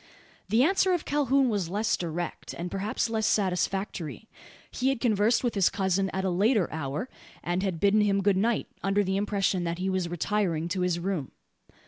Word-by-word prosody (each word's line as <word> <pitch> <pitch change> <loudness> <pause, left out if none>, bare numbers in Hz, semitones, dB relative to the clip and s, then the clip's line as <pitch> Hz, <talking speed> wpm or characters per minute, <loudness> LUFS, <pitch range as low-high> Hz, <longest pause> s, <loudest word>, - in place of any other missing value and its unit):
The 225 +5 +4
answer 375 +3 +3
of 350 - -1
Calhoun 275 -2 +2
was 200 -7 -1
less 210 +4 +1
direct, 175 0 -5
and, 175 +1 -5
perhaps, 200 +4 -1
less 220 -1 0
satisfactory. 190 -2 -1 0.4
He 260 +1 0
had 270 -3 0
conversed 225 0 +2
with 240 - 0
his 195 -4 +3
cousin 195 -1 0
at 190 0 -3
a 190 - +1
later 205 +1 +2
hour, 150 - -3 0.4
and 175 +2 -1
had 190 -4 -2
bidden 205 +3 +4
him 200 -1 +2
good 200 -1 +3
night, 220 +4 +1 0.2
under 195 +1 +2
the 190 0 -1
impression 200 -3 0
that 170 0 -2
he 190 +1 -1
was 185 -2 -1
retiring 175 -2 -1
to 185 +1 -1
his 180 -1 +1
room. 175 -6 -2
195 Hz, 185 wpm, -27 LUFS, 180-220 Hz, 0.4 s, The